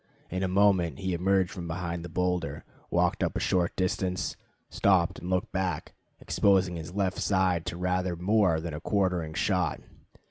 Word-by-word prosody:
In 95 Hz, +1 st, -2 dB
a 95 Hz, -, +1 dB
moment 95 Hz, -3 st, +3 dB
he 95 Hz, -2 st, -2 dB
emerged 95 Hz, +1 st, +2 dB
from 85 Hz, -1 st, -6 dB
behind 85 Hz, 0 st, -3 dB
the 85 Hz, -, -7 dB
boulder, 90 Hz, -3 st, -1 dB, 0.3 s
walked -, -, +1 dB
up -, -, -1 dB
a -, -, 0 dB
short 90 Hz, -2 st, +1 dB
distance, 90 Hz, 0 st, -1 dB, 0.3 s
stopped 95 Hz, -4 st, +2 dB
and 90 Hz, -, -6 dB
looked 95 Hz, +4 st, 0 dB
back, 95 Hz, -5 st, -2 dB, 0.3 s
exposing 95 Hz, -3 st, +2 dB
his 85 Hz, +2 st, -7 dB
left 95 Hz, -2 st, 0 dB
side 95 Hz, -4 st, +1 dB
to 85 Hz, -, -3 dB
rather 90 Hz, 0 st, 0 dB
more 90 Hz, -2 st, +2 dB
than 80 Hz, -1 st, -5 dB
a 75 Hz, -, -5 dB
quartering 90 Hz, -6 st, 0 dB
shot. 90 Hz, -7 st, 0 dB
90 Hz, 170 wpm, -28 LUFS, 85-95 Hz, 0.3 s, moment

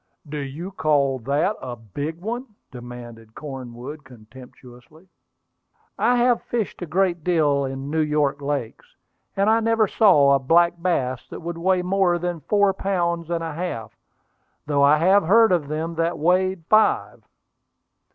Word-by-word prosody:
"Do 150 Hz, +1 st, -5 dB
you 145 Hz, +7 st, -6 dB
call 145 Hz, -6 st, +1 dB
that 145 Hz, -, 0 dB
a 125 Hz, -, -6 dB
big 145 Hz, -, -6 dB
one?" 240 Hz, +6 st, -4 dB, 0.2 s
demanded 120 Hz, -2 st, -11 dB
Cornwood 135 Hz, +1 st, -8 dB
contemptuously. 125 Hz, -, -16 dB, 0.9 s
"I 245 Hz, -, +2 dB
have 245 Hz, -1 st, +2 dB
fished 230 Hz, -6 st, -4 dB
a 175 Hz, -, -4 dB
great 175 Hz, 0 st, 0 dB
deal 150 Hz, -5 st, +2 dB
in 135 Hz, 0 st, -5 dB
the 160 Hz, -, -2 dB
New -, -, +3 dB
York 150 Hz, -2 st, 0 dB
lakes, 140 Hz, -5 st, -5 dB, 0.4 s
and 195 Hz, +1 st, +2 dB
I 220 Hz, +1 st, +4 dB
never 225 Hz, -1 st, +2 dB
saw 175 Hz, -11 st, +4 dB
a 140 Hz, -, +3 dB
black 170 Hz, +5 st, +2 dB
bass 130 Hz, -8 st, -1 dB
that -, -, -8 dB
would 170 Hz, 0 st, -6 dB
weigh 185 Hz, +1 st, +1 dB
more 185 Hz, -1 st, +2 dB
than 175 Hz, -1 st, -3 dB
four 200 Hz, +5 st, +2 dB
pounds 170 Hz, -4 st, -2 dB
and 170 Hz, -1 st, -2 dB
a 165 Hz, -2 st, -4 dB
half, 155 Hz, -10 st, -5 dB, 0.7 s
though 145 Hz, -1 st, 0 dB
I 145 Hz, +2 st, +5 dB
have 190 Hz, +6 st, +4 dB
heard 225 Hz, +5 st, +5 dB
of 170 Hz, -5 st, +1 dB
them 160 Hz, +3 st, -3 dB
that 165 Hz, +1 st, 0 dB
weighed 180 Hz, +1 st, +1 dB
five." 215 Hz, 0 st, +2 dB
160 Hz, 155 wpm, -22 LUFS, 140-185 Hz, 0.9 s, I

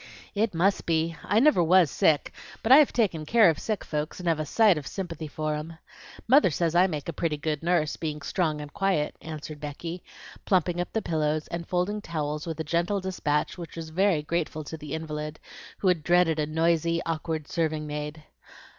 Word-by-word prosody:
"It 215 Hz, -2 st, 0 dB
must 195 Hz, +4 st, +1 dB
be! 165 Hz, 0 st, +1 dB
I 205 Hz, +3 st, +2 dB
never 290 Hz, -7 st, +5 dB
was 175 Hz, -2 st, +5 dB
sick, 150 Hz, -2 st, +2 dB, 0.3 s
but 225 Hz, -, +1 dB
I 265 Hz, -, +11 dB
have 300 Hz, -2 st, +5 dB
taken 195 Hz, -10 st, 0 dB
care 215 Hz, +2 st, +5 dB
of 155 Hz, -, -6 dB
sick 215 Hz, -4 st, -3 dB
folks, 150 Hz, +2 st, -4 dB
and 180 Hz, -, -5 dB
have 165 Hz, -2 st, +2 dB
a 155 Hz, -, -3 dB
sight 215 Hz, 0 st, +5 dB
of 150 Hz, -3 st, -5 dB
sympathy 165 Hz, -5 st, -5 dB
for 155 Hz, +1 st, -3 dB
'em. 155 Hz, +2 st, -6 dB, 0.5 s
Mother 265 Hz, -3 st, +6 dB
says 165 Hz, +1 st, 0 dB
I 180 Hz, +2 st, +5 dB
make 150 Hz, -6 st, -5 dB
a 170 Hz, -, -3 dB
pretty 155 Hz, 0 st, -1 dB
good 150 Hz, 0 st, -2 dB
nurse, 165 Hz, -3 st, +1 dB
being 150 Hz, -2 st, -4 dB
strong 155 Hz, -2 st, -1 dB
and 150 Hz, -1 st, -9 dB
quiet," 190 Hz, -7 st, 0 dB
answered 155 Hz, -1 st, -7 dB
Becky, 165 Hz, +4 st, -6 dB, 0.4 s
plumping 175 Hz, -2 st, +1 dB
up 175 Hz, -, -5 dB
pillows 155 Hz, -1 st, 0 dB
and 170 Hz, 0 st, -5 dB
folding 185 Hz, +4 st, -1 dB
towels 150 Hz, -3 st, -3 dB
with 165 Hz, -1 st, -4 dB
a -, -, -1 dB
gentle 170 Hz, +6 st, 0 dB
despatch 180 Hz, -4 st, -1 dB
which 170 Hz, -, -8 dB
was 160 Hz, -1 st, -7 dB
very 180 Hz, -2 st, +2 dB
grateful 155 Hz, -1 st, -2 dB
to 155 Hz, -, -7 dB
the 150 Hz, -1 st, -6 dB
invalid, 150 Hz, -1 st, -5 dB, 0.4 s
who 195 Hz, -, -1 dB
had 180 Hz, -3 st, +3 dB
dreaded 175 Hz, -1 st, +3 dB
a 150 Hz, -, 0 dB
noisy, 165 Hz, +1 st, +1 dB
awkward 160 Hz, -2 st, -3 dB
serving 155 Hz, -2 st, -1 dB
maid. 150 Hz, +1 st, -5 dB
165 Hz, 200 wpm, -27 LUFS, 150-180 Hz, 0.5 s, I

